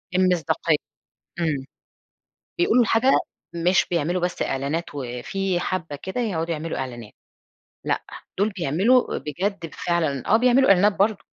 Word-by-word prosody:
المصداقية، 170 -4 +2 0.6
امم، 145 -5 -1 0.9
بيقولوا 345 -8 +4
الحاجة 230 +4 +3 0.4
مش 175 +2 +2
بيعملوا 175 +2 0
بس 180 0 -1
إعلانات، 140 +6 -2
وفي 145 +9 -2
حبة 165 -6 -3
كده 190 - -4
يقعدوا 170 -8 -1
يعملوا 160 +1 -4
إعلانات. 120 -4 -6 0.7
لأ، - - 0 0.4
دول 205 +3 +2
بيعملوا 195 - +2
بجد 170 +4 -3
فعلًا 160 -6 -1
آه، 215 - +6
بيعملوا 250 +3 +4
إعلانات 195 +2 +5
برضه، 205 +1 +1
175 Hz, 120 wpm, -23 LUFS, 150-200 Hz, 0.9 s, آه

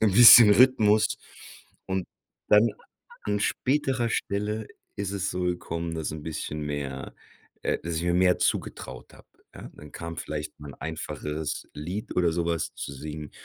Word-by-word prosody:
'n 105 -3 +3
bisschen 115 0 +10
Rhythmus. 110 -2 +4 0.7
Und 95 -1 -2 0.4
dann, 105 +3 +6 0.6
an 105 0 0
späterer 130 +1 0
Stelle, 105 +1 -2 0.3
ist 100 -1 -3
es 100 -1 -2
so 90 - -3
gekommen, 85 -1 -3
dass 80 -2 -3
'n 75 -1 -7
bisschen 75 -1 -5
mehr 70 -3 -5 0.5
äh, - - 0
dass 85 -1 -4
ich - - -2
mir 85 0 +1
mehr 90 0 +3
zugetraut 65 -1 -3
hab. - - -18 0.3
Ja, - - -9
dann 75 - -13
kam 85 -1 -7
vielleicht 75 -1 -5
mal 75 -1 -9
'n - - -10
einfacheres 80 -1 -5
Lied 90 +8 -6
oder 85 -2 +3
so 85 0 -1
was 85 -2 -2
zu - - -6
singen 75 +2 -7
85 Hz, 160 wpm, -26 LUFS, 75-105 Hz, 0.7 s, bisschen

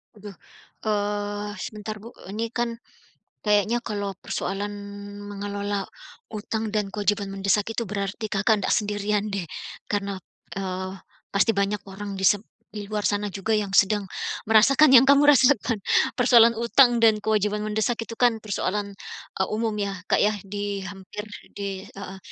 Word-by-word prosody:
Aduh, 205 -2 -10 0.5
eee, 205 0 -1
sebentar 215 +2 -5
Bu, 230 +4 -11 0.2
ini 225 +3 -2
kan 235 -1 -2 0.7
kayaknya 210 +3 +2
kalau 205 -2 -3
persoalan 200 +1 -3 0.6
mengelola 200 0 -3 0.4
utang 220 +1 -3
dan 205 -2 -1
kewajiban 205 -1 0
mendesak 195 +1 +1
itu 235 - -2
berarti 205 +2 -3
Kakak 210 +1 +2
ndak - - +1
sendirian 210 0 0
deh. 195 -3 -3 0.4
Karena, 200 -1 -1 0.4
eee, 185 -1 -4 0.4
pasti 200 +3 +4
banyak 200 +1 0
orang 200 +1 -6
di 190 - -3
sep 205 0 +4 0.3
di 210 -1 -7
luar 210 0 -2
sana 205 0 0
juga 200 +2 -4
yang 210 -3 +1
sedang 205 0 +4 0.4
merasakan 265 +6 +6
yang 235 - +10
kamu 280 +2 +5
rasakan. 250 -6 +4 0.3
Persoalan 235 -2 +6
utang 235 +1 +4
dan 220 -2 +6
kewajiban 210 0 0
mendesak 220 +2 0
itu 230 - -7
kan 235 -1 +3
persoalan, 205 -1 -2 0.4
e - - 0
umum 220 0 -1
ya 200 -2 -3
Kak, - - +2
ya 210 - +4 0.2
di 205 0 -3
hampir 195 +2 -8 0.2
di 195 -1 -5
heeh. 195 -1 -9
210 Hz, 145 wpm, -25 LUFS, 200-220 Hz, 0.7 s, yang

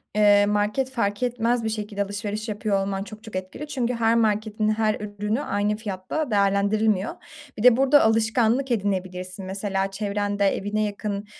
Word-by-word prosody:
eee, 205 -1 +5
market 210 +6 0
fark 205 -2 -1
etmez 240 -1 0
bir 220 - -1
şekilde 210 -2 -3
alışveriş 205 +2 -4
yapıyor 205 -1 0
olman 195 0 -3
çok 215 +1 -11
çok 220 -5 -10
etkili 185 +11 -5
çünkü 250 -4 -1
her 230 0 +2
marketin 215 -1 +1
her 215 0 +1
ürünü 210 +4 -3
aynı 205 -3 0
fiyatta 215 +7 -4
değerlendirilmiyor. 200 +1 +2 0.4
Bir 210 - -4
de 250 -1 +7
burada 275 +2 +5
alışkanlık 225 +3 +2
edinebilirsin 185 -3 -2
mesela 195 0 -2
çevrende 205 0 -1
evine 205 +2 0
yakın, 205 0 -3
210 Hz, 155 wpm, -24 LUFS, 200-225 Hz, 0.4 s, de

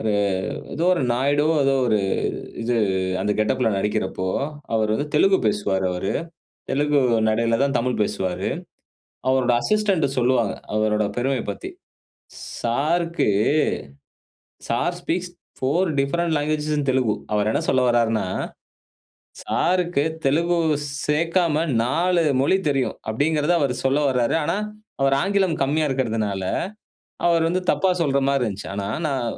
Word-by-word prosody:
ஒரு 110 -1 0 0.6
ஏதோ 165 - -1
ஒரு 170 - -1
நாயுடு 145 +4 +1 0.2
ஏதோ 135 0 +3
ஒரு 110 -3 +2 0.6
இது 120 +1 0 0.5
அந்த 105 +1 +1
கெட்டப்ல 120 +2 +1
நடிக்கிறப்போ, 95 -2 -1 0.5
அவர் 110 -1 +1
வந்து 145 - -1
தெலுங்கு 190 +5 +4
பேசுவார் 95 -3 0
அவர், 90 +2 -2 0.6
தெலுங்கு 145 0 +2 0.3
நடையில 115 +1 +1
தான் 140 0 +1
தமிழ் 125 0 -1
பேசுவார். 95 -3 -2 0.8
அவரோட 130 -2 +2
அசிஸ்டன்ட் 210 -7 +2
சொல்லுவாங்க. 120 -4 +2 0.2
அவரோட 110 0 +1
பெருமைய 130 0 0
பத்தி, - - -6 0.9
"சாருக்கு 165 +8 0 1.4
சார் 175 +9 0
ஸ்பீக்ஸ் 175 +1 -2 0.3
4 165 +8 +1
டிஃபரண்ட் 165 +4 0
லாங்குவேஜ் 150 +1 -1
இன் 140 -2 -2
தெலுங்கு." 125 -5 +1 0.2
அவர் 105 0 +1
என்ன 140 - 0
சொல்ல 130 - +3
வரார்னா, 115 -3 +2 1.2
"சாருக்கு 175 -4 +1 0.2
தெலுங்கு 170 +5 +2 0.5
சேர்க்காம 165 +1 +1 0.2
4 170 +7 +1 0.2
மொழி 185 +8 +3
தெரியும்" 135 -2 -1
அப்டீங்கறத 150 +6 +1
அவர் 140 -4 +1
சொல்ல 135 +2 +3
வராரு. 125 -3 +1
ஆனா, 195 - 0 0.4
அவர் 135 0 +3
ஆங்கிலம் 195 -4 +1
கம்மியா 150 +3 +1
இருக்கறதுனால, 110 -7 -1 0.8
அவர் 170 -1 +3
வந்து 180 +2 -1
தப்பா 190 - +2
சொல்ற 140 -3 +1
மாரி 140 -1 +1
இருந்துச்சு. 105 -3 -4
ஆனா, 100 0 -3 0.2
நான் 135 -4 -1
135 Hz, 125 wpm, -22 LUFS, 115-165 Hz, 1.4 s, தெலுங்கு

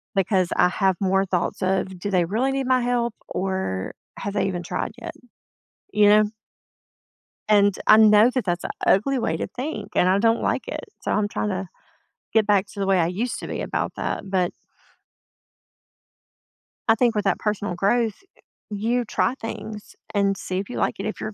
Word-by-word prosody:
because 190 -2 +2
I 180 - +4
have 190 0 +1
more 195 0 +2
thoughts 180 0 -2
of, 190 0 -1
"Do 205 - -3
they 180 -2 +3
really 230 +9 0
need 270 0 -1
my 255 -1 +3
help, 240 -1 0 0.2
or 190 - -2 0.3
have 200 - -4
they 200 -1 +1
even 175 -2 -3
tried 180 +1 -3
yet?" 335 -1 -6 0.8
You 210 -1 +5
know? 210 +1 +6 1.3
And 205 -1 +5
I 215 - +8
know 215 +1 +7
that 255 - -1
that's 175 -2 -1
a - - -3 0.2
ugly 260 +7 +3
way 160 -8 -1
to - - -3
think, 265 +10 -5
and 180 - +4
I 190 +2 +3
don't 225 +2 +3
like - - -1
it, - - -5 0.2
so - - -2
I'm 210 -1 +1
trying 210 - -2
to 190 -1 -3 0.7
get 220 -2 +3
back 205 -2 +3
to 200 - -9
the 195 - 0
way 195 -1 +3
I 165 - +3
used 210 +8 -2
to - - -6
be - - -4
about - - -2
that. 195 - -4
But 185 -2 +1 2.4
I 225 - +6
think 235 0 +2
with 210 -1 -1
that 195 - +1
personal 205 -3 -2
growth, 215 +4 +1 0.5
you 230 +4 -1
try 245 - 0
things 220 -3 -7 0.2
and 200 -1 +1
see 185 -1 -3
if 195 - -5
you 245 - -5
like - - 0
it, 195 - -3
if 215 - -4
you're 215 - -4
205 Hz, 190 wpm, -23 LUFS, 190-225 Hz, 2.4 s, I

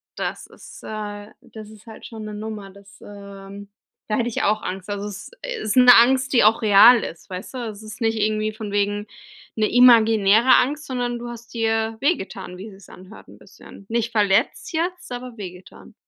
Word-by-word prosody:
Das - - -5
ist, - - -15
äh 205 -1 -7
das 215 -1 -12
ist 215 0 -16
halt 220 - -12
schon 220 -2 -9
'ne 210 - -7
Nummer 210 -1 -7
das 200 0 -18
ähm 200 0 -11 0.4
da 215 - 0
hätte 240 -1 -1
ich 230 - -3
auch 215 +1 +1
Angst. 190 +1 -6
Also, 205 0 -4
es 205 -1 -8 0.3
ist 215 - -2
'ne 250 -1 +8
Angst, 260 +3 +4
die 240 -5 +4
auch 220 +2 +4
real 220 +3 +7
ist, 165 +4 -9
weißt 185 +7 -8
du? - - -4
Es 210 0 -11
ist 215 +2 -10
nicht 225 -1 0
irgendwie 215 0 -1
von 215 -2 -7
wegen, 205 0 -1 0.5
'ne 215 -1 +1
imaginäre 225 -1 +5
Angst, 295 +4 0
sondern 245 -3 -3
du 240 - -7
hast 235 0 -11
dir 225 -1 -1
wehgetan, 195 - -3
wie 195 +4 -9
es 195 -1 -16
sich - - -16
anhört 185 +4 -15
'n - - -16
bisschen. 200 - -16
Nicht 235 0 -2
verletzt 205 - +1
jetzt, 345 -1 -3
aber 245 -1 -7
wehgetan. 180 -2 -11
215 Hz, 195 wpm, -22 LUFS, 205-235 Hz, 0.5 s, ne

